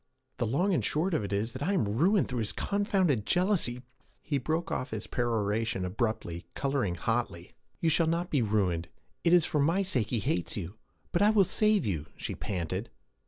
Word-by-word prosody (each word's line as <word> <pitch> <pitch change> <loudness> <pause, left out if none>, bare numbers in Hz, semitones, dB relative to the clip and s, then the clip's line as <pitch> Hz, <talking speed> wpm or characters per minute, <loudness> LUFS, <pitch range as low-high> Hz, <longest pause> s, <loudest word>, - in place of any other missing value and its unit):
'The 120 -3 0
long 180 - +1
and - - +1
short 170 +5 0
of 155 - +1
it 100 - -5
is 105 +4 -1
that 130 - -8
I 180 +7 +1
am 185 - +2
ruined 170 - +3
through 125 -2 -3
his 105 -2 -1
confounded 195 - +1
jealousy' 175 - +1 0.4
He 145 -3 -1
broke 160 +6 -2
off 130 - -2
his - - -4
peroration 115 -3 -1
abruptly, 90 -4 -3
coloring 135 -10 0
hotly. 90 -2 -2 0.3
'You 165 - +3
shall 160 +1 +3
not 170 +2 -1
be 145 - +2
ruined! 95 -6 0 0.4
It 170 - +3
is 175 -2 +6
for 150 - 0
my 165 +7 +2
sake 125 - 0
he 120 - 0
hates 90 -5 -1
you! 90 -2 -5 0.4
But 175 - +1
I 205 - +6
will 215 -2 +5
save 210 - +2
you!' 80 -7 -2
she - - -4
panted. 95 +3 -3
125 Hz, 195 wpm, -29 LUFS, 105-170 Hz, 0.4 s, is